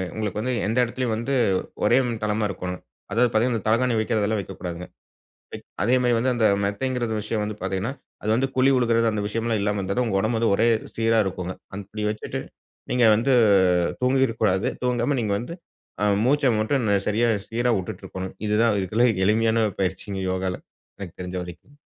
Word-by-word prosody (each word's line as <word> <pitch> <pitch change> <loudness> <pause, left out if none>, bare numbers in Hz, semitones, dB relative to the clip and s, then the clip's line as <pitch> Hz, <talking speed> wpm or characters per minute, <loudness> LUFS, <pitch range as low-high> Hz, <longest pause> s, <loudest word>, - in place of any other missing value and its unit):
உங்களுக்கு 105 -2 -3
வந்து 125 +3 -1
எந்த 110 +4 -1
எடத்திலயும் 120 -1 -2
வந்து, 115 +5 -2 0.5
ஒரே 120 +4 +5 0.3
தளமா 105 +1 0
இருக்கோணும். 90 -1 -5 0.3
அதாவது 120 +4 +3
பாத்தீங்கன்னா, 115 +1 +2
அந்த - - -7
தலகாணி 120 +2 +2
வக்கிறதெல்லாம் 110 -2 0
வக்கக்கூடாதுங்க. 90 -2 -7 1.0
அதே 120 +5 +3
மாரி 125 -1 +2
வந்து, 130 +3 +1
அந்த 115 -2 +2 0.2
மெத்தைங்கிற 120 +4 -1 0.2
விஷயம் 110 0 -2
வந்து 105 0 -5
பாத்திங்கன்னா, 95 +6 -2 0.3
அது 110 - -1
வந்து 135 +3 +1
குழி 130 +1 +4
விழுகுறது 115 -2 +2
அந்த 105 -1 -2
விஷயம்லாம் 115 +1 -1
இல்லாம 105 0 0
இருந்தா 100 +1 -3
தான், 125 -1 +1
உங்க 95 -3 0
ஒடம்பு 110 +3 0
வந்து 115 -2 +2
ஒரே 115 - +3 0.3
சீரா 115 0 +3
இருக்குங்க. 90 -1 -4 0.2
அப்டி 105 +2 -6
வச்சுட்டு 105 0 -4 0.5
நீங்க 125 -1 +3
வந்து, 125 +5 +1 0.7
தூங்கிருக்க 130 -2 +2
கூடாது. 95 -2 +2 0.2
தூங்காம 125 +2 +1
நீங்க 105 -3 -1
வந்து, 125 +8 -6 0.5
ஆ - - +2 0.2
மூச்ச 145 +3 +2
மட்டும் 115 +2 0 0.2
சரியா 115 +3 +2 0.2
சீரா 120 +2 +1
விட்டுட்டு 90 - -7
இருக்கணும். 95 0 -6
இதுதான் 105 +1 +3
இதுல 110 +6 +2 0.2
எளிமையான 110 +1 +2
பயிற்சிங்க 95 +1 -3
யோகால்ல, 95 -1 -2 0.4
எனக்கு 95 -3 -8
தெரிஞ்ச 90 0 -5
வரைக்கும். 90 - -12
110 Hz, 165 wpm, -24 LUFS, 100-120 Hz, 1.0 s, ஒரே